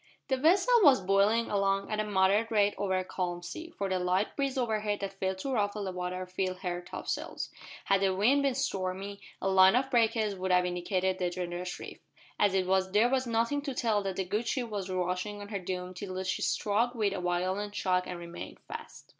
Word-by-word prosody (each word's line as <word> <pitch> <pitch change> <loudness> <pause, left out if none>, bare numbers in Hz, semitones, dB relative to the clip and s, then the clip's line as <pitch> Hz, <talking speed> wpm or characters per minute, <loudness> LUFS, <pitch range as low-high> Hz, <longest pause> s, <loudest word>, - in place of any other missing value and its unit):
The 265 - +2
vessel 370 - +4
was 280 -8 +7
bowling 200 +5 +2
along 195 0 +1
at 215 - -1
a - - +2
moderate 205 +2 +2
rate 205 -2 +3
over 190 -2 -1
a 185 - 0
calm 175 -1 -3
sea, 320 - -7
for 200 - -1
the 185 -1 0
light 180 +3 0
breeze 275 -1 -1
overhead 215 -4 0
that 195 -1 -3
failed 190 0 -1
to 270 +8 -4
ruffle 205 -2 0
the 190 - -3
water 180 0 -4
filled 185 0 -3
her 180 -2 -2
topsails. 175 - -5 0.3
Had 195 0 +3
the 190 -1 +2
wind 245 +9 +4
been 275 -2 +1
stormy 195 -5 -3 0.2
a - - -2
line 190 +1 +6
of 265 +1 +1
breakers 225 -3 +2
would 190 -1 -3
have 180 0 +4
indicated 185 +1 -1
the 180 -1 +1
dangerous 180 0 -4
reef. - - -9 0.4
As 205 -2 +3
it 190 -1 +2
was 190 0 +1
there 220 +4 +5
was 260 -1 +1
nothing 235 +5 +1
to 280 -2 -4
tell 220 -4 +1
that 195 -2 -3
the 190 - -1
good 210 +6 -2
ship 245 -2 -1
was 195 -2 -3
rushing 185 +3 -2
on 205 0 -8
her 200 -2 -3
doom 180 0 -4
till 185 0 -5
she 185 - -2
struck 230 +4 +1
with 210 -4 +1
a 190 - -3
violent 185 +4 -1
shock 180 -2 +1
and 180 - -5
remained 170 0 -8
fast. - - -9
195 Hz, 215 wpm, -30 LUFS, 185-220 Hz, 0.4 s, was